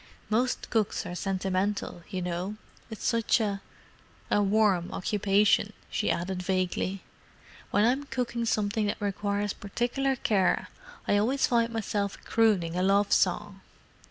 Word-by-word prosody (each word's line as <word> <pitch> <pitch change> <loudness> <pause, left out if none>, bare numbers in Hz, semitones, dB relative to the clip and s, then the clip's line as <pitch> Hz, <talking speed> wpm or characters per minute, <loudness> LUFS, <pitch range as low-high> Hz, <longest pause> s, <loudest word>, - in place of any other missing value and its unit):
Most 245 +4 0
cooks 220 -3 0
are - - -5
sentimental, 190 0 -2
you 185 -1 -3
know: 180 +4 -3 0.3
it's 220 - -7
such 230 0 +2
a—a 205 0 -4
warm 200 -3 +2
occupation," 205 +1 +2 0.2
she - - 0
added 180 +1 -1
vaguely. 185 +1 -1 0.7
"When 205 - +3
I'm 265 +4 +1
cooking 240 -3 -2
something 210 -1 0
that 205 - -2
requires 205 0 -1
particular 245 +6 -1
care 195 -7 +1 0.4
I 205 - +3
always 255 +6 +2
find 235 -2 +2
myself 205 -3 -2
crooning 200 -7 +2
a 180 - 0
love 200 +2 +3
song!" - - +1
205 Hz, 130 wpm, -28 LUFS, 190-225 Hz, 0.7 s, When